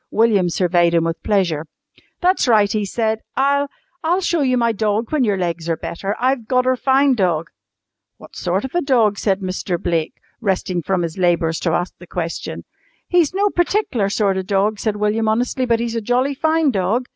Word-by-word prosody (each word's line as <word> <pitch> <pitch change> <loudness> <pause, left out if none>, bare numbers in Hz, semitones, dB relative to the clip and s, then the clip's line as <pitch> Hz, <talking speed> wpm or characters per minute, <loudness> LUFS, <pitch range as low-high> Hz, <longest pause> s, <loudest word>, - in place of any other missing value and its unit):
William 210 -5 +3
surveyed 175 -1 +2
him 165 - +3
with 165 0 -3
pleasure. 175 -7 0 0.5
"That's 365 -5 +2
right," 210 -4 +4
he 210 -1 -1
said. 220 +2 -1 0.2
"I'll 280 +1 +2 0.4
I'll 345 +3 +2
show 345 -3 0
you 255 -2 +2
my 235 -1 +2
dog 215 +1 -1
when 300 -4 +2
your 205 -4 +1
legs 170 -2 -3
are 165 - 0
better. 195 +4 -4
I've 255 -2 0
gotter 255 +1 +2
fine 270 +2 +3
dog!" 175 -7 0 0.7
"What - - -15
sort 185 +6 -1
of 265 - -7
a 350 - +1
dog?" 230 - +2
said 195 -1 0
Mr. 185 -1 -3
Blake, 165 -2 -1 0.2
resting 190 -4 -1
from 180 +2 -1
his 165 +2 -5
labours 170 -2 +1
to 165 - -1
ask 175 - -2
the 175 - -13
question. 165 -1 -5 0.4
"He's 350 -1 +2
no 405 +1 +2
partic'lar 350 - 0
sort 200 -2 +1
of - - 0
a - - -25
dog," 205 +1 +1
said 215 -2 -1
William 210 +2 0
honestly, 245 +3 0
"but 230 -1 +2
he's 235 0 -2
a 230 - -1
jolly 250 +5 +1
fine 315 +1 +2
dog. 215 +5 0
215 Hz, 195 wpm, -19 LUFS, 180-255 Hz, 0.7 s, right